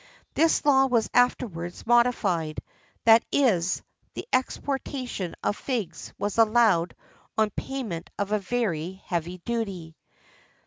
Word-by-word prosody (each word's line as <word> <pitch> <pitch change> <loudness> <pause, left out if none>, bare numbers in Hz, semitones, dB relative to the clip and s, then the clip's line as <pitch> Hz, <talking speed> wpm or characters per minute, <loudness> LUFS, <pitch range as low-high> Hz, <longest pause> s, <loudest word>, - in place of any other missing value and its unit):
[XIII - - -27
50] - - -1
This 325 -2 +3
law 270 -2 +5
was 235 -4 +1
afterwards 190 -8 0
modified, 215 -10 +2 0.5
that 225 0 +7
is, 190 -11 +2 0.3
the - - -6
exportation 255 -7 -2
of 205 - +1
figs 215 -12 -4
was 205 +2 -2
allowed 215 -7 +4 0.4
on 215 -1 +2
payment 210 -10 -5
of 200 0 -2
a 215 - +2
very 190 -6 -2
heavy 175 +1 -3
duty. 195 -9 -3
215 Hz, 125 wpm, -26 LUFS, 175-245 Hz, 0.5 s, that